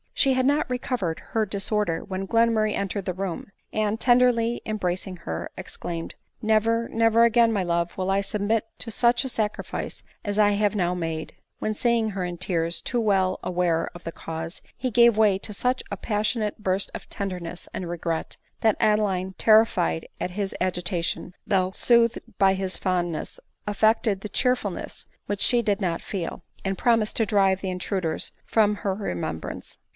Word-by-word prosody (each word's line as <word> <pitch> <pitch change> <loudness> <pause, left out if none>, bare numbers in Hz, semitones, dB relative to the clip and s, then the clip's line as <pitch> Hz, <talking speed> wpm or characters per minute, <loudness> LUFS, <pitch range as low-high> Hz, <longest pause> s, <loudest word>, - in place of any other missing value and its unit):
She 270 - +4
had 255 0 +2
not 290 +1 +2
recovered 245 -9 -2
her 220 -2 +1
disorder 200 -3 -1
when 195 -1 -4
Glenmurray 230 -1 +3
entered 200 0 -2
the 185 - -1
room, 190 +1 -4 0.2
and, 215 0 0
tenderly 240 -1 +3
embracing*her, 180 - -3
exclaimed, 165 -1 -5 0.2
" - - -54
Never, 225 +2 +2
never 225 0 +4
again, 235 0 +5
my 200 -4 +1
love, 170 0 0
will 190 0 0
I 195 +1 +2
submit 210 +2 0
to 230 - -3
such 240 +3 +3
a 265 - -2
sacrifice 215 -3 -3 0.2
as 205 -1 -2
I 210 -1 +5
have 205 +1 +1
now 180 -3 +1
made 165 -3 -3
;" - - -52
when 215 - -1
seeing 230 0 +1
her 190 -2 -3
in 175 -1 -4
tears, 170 -2 -1
too 245 - -1
well 190 -3 +2
aware 175 -2 +1
of 175 - -10
the 165 - -4
cause, 165 +1 -6
he 255 - -2
gave 235 0 +6
way 210 -3 +5
to 210 - -7
such 250 +5 0
a 200 - -2
pas 210 +2 -1
sionate 215 -3 -1
burst 190 -2 0
of - - -8
tenderness 180 -4 -5
and 180 - -4
regret, 165 -1 -3 0.2
that 220 -2 +3
Adeline, 195 -3 +2
ter 220 0 +7
rified 80 - -1
at 180 - -2
his 195 +1 -3
agitation, 180 -1 -1
though 185 -2 +2
soothed 235 +2 +3 0.2
by 195 -1 +5
his 190 -1 -2
fondness, 175 -3 -2 0.3
affected 210 -1 +2
the 210 - -6
cheerfulness 245 -7 -1 0.2
which 205 0 -2
she 240 -2 +4
did 205 -2 0
not 170 -3 -1
feel, 185 -5 -5 0.2
and 190 0 -1
promised 230 -3 +2
to 225 - +3
drive 195 -2 +3
the 190 - -2
intruders 180 -3 -2
from 210 -2 +3
her 200 -1 -1
remembrance. 85 - -5
200 Hz, 175 wpm, -25 LUFS, 180-220 Hz, 0.3 s, ter